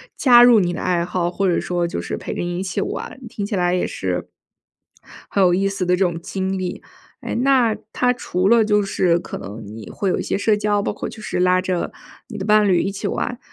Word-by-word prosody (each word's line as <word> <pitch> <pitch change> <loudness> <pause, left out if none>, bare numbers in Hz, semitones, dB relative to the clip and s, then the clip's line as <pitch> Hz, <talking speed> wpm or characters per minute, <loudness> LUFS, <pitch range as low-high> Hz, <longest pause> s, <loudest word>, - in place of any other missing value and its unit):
加 240 -3 +7
入 240 -2 +7
你 175 -2 0
的 - - -5
爱 175 -2 0
好， 175 -1 -1
或 195 +2 -1
者 175 - +2
说 175 -1 -1
就 170 - -4
是 - - -4
陪 - - -5
着 - - -4
你 175 0 -3
一 - - -2
起 185 -2 -2
玩。 - - -5
听 210 -2 -5
起 205 - -3
来 180 -1 +1
也 180 - 0
是 90 -1 -3 1.0
很 200 - +2
有 180 -2 +5
意 195 +2 +2
思 195 -2 -3
的 180 0 +3
这 - - -6
种 170 -2 -2
经 190 +2 -3
历。 185 -1 -4 0.4
哎， - - -4
那 250 -3 +3 0.2
它 250 0 +2
除 190 -6 -1
了 230 -1 +5
就 210 -1 +3
是 180 -3 +1
可 - - -7
能 105 +3 -8
你 110 +1 -9
会 195 - -2
有 - - 0
一 - - -2
些 - - -1
社 210 +1 +2
交， 205 -1 +1
包 - - -1
括 - - -5
就 220 - -10
是 195 - -3
拉 180 0 +3
着 185 -2 -2 0.4
你 210 - -8
的 190 - -4
伴 210 -1 +4
侣 180 -3 +3
一 195 - -2
起 200 - -4
玩， 245 -1 -3
190 Hz, 265 characters per minute, -21 LUFS, 175-210 Hz, 1.0 s, 加